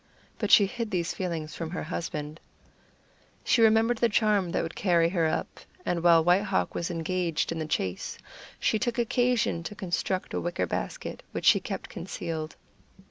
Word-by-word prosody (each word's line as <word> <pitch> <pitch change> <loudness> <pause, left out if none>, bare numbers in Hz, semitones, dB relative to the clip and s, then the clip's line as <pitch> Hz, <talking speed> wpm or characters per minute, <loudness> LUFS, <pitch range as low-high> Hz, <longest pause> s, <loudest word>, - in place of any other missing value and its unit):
But - - -1
she 205 - +8
hid 230 +3 -4
these 175 -3 -1
feelings 165 -5 -4
from 165 -2 -5
her 180 - -4
husband. 155 -2 -5 1.0
She 235 - +3
remembered 225 +1 +4
the 235 - +3
charm 205 -4 +2
that - - 0
would 165 0 -5
carry 170 -3 +3
her 170 -3 +1
up, 155 - -3 0.3
and 170 -1 0
while 170 -1 +6
White 180 +3 +4
Hawk 195 -2 0
was 170 - -2
engaged 170 -1 -1
in 165 - -3
the 155 - -3
chase, 95 -11 -2 0.4
she 220 - +1
took 240 +2 -1
occasion 240 -5 +1
to 210 +5 -7
construct 185 0 -2
a - - -1
wicker 175 - -1
basket, - - -4
which - - -4
she - - +7
kept - - -5
concealed. 160 -2 -5
175 Hz, 175 wpm, -28 LUFS, 165-210 Hz, 1.0 s, she